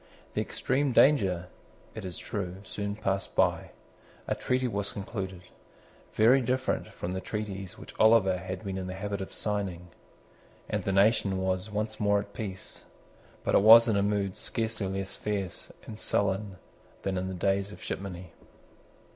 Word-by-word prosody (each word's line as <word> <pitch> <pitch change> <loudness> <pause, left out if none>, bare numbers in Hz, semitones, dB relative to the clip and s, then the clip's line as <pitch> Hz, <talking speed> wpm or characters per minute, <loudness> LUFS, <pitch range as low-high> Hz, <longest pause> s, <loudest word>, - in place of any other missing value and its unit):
The - - 0
extreme 140 -1 0
danger, 95 -12 +4 0.5
it 110 - -7
is 90 -2 -5
true, 90 -4 -4
soon 100 +1 -4
passed 100 -2 -2
by. - - +2 0.6
A - - +1
treaty 125 0 0
was 100 -3 -2
concluded, 95 -3 -5 0.7
very 120 +5 +6
different 130 +2 0
from 90 - -5
the 95 - -3
treaties 100 -3 -5
which - - -11
Oliver 110 -4 +5
had 95 +1 -6
been 95 -2 -3
in 95 - -4
the 90 - -5
habit 100 0 -3
of 95 - -6
signing; 95 -4 -2 0.8
and - - -2
the 95 - +1
nation 100 0 +3
was 95 +1 -1
once 110 +1 -3
more 105 -1 +3
at 100 0 -8
peace, 95 -4 -7 0.6
but - - 0
was 115 +3 +9
in 110 - +2
a 100 - +3
mood 100 -1 0
scarcely 110 -3 -2
less 95 0 -4
fierce 100 -4 -4
and 110 -1 -8
sullen 100 -1 0 0.5
than 95 -1 -1
in 95 0 -2
the 95 - -4
days 100 +2 0
of - - -11
shipmoney. 90 -3 -6
100 Hz, 160 wpm, -29 LUFS, 95-110 Hz, 0.8 s, was